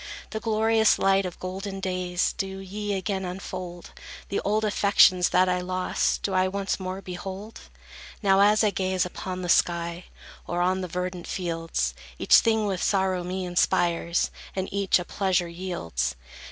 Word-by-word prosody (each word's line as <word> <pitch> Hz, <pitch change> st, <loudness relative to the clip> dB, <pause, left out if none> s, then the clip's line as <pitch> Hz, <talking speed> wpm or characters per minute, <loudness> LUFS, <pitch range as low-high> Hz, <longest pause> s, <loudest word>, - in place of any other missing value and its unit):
The 220 Hz, -, -3 dB
glorious 220 Hz, 0 st, +3 dB
light 195 Hz, -1 st, +3 dB
of 180 Hz, -, -9 dB
golden 195 Hz, +2 st, -5 dB
days 180 Hz, -1 st, -1 dB
Do 190 Hz, -2 st, -4 dB
ye 205 Hz, +2 st, -4 dB
again 190 Hz, 0 st, -2 dB
unfold? 180 Hz, -1 st, -6 dB, 0.4 s
The 200 Hz, -, 0 dB
old 215 Hz, +2 st, 0 dB
affections 200 Hz, -3 st, +4 dB
that 185 Hz, +1 st, +4 dB
I 180 Hz, 0 st, +1 dB
lost, 185 Hz, 0 st, -1 dB
Do 195 Hz, -, -1 dB
I 185 Hz, 0 st, +3 dB
once 195 Hz, +1 st, -2 dB
more 185 Hz, +1 st, -5 dB
behold? 190 Hz, +4 st, -7 dB, 0.6 s
Now, 195 Hz, -1 st, +5 dB
as 210 Hz, +2 st, +5 dB
I 210 Hz, -, +3 dB
gaze 185 Hz, -1 st, 0 dB
upon 185 Hz, +1 st, -5 dB
the -, -, -3 dB
sky, 170 Hz, 0 st, +1 dB, 0.4 s
Or 175 Hz, -, -2 dB
on 185 Hz, +1 st, +1 dB
the 185 Hz, -, -3 dB
verdant 180 Hz, 0 st, -4 dB
fields, 165 Hz, -, -2 dB, 0.2 s
Each -, -, +6 dB
thing 220 Hz, -1 st, +2 dB
with 190 Hz, -3 st, -2 dB
sorrow 190 Hz, -2 st, +1 dB
me 185 Hz, +1 st, -3 dB
inspires, 175 Hz, -1 st, +1 dB, 0.2 s
And 190 Hz, 0 st, -2 dB
each 200 Hz, -1 st, +3 dB
a 180 Hz, -, -5 dB
pleasure 185 Hz, -3 st, 0 dB
yields. 170 Hz, -, -3 dB
185 Hz, 160 wpm, -26 LUFS, 180-195 Hz, 0.6 s, Each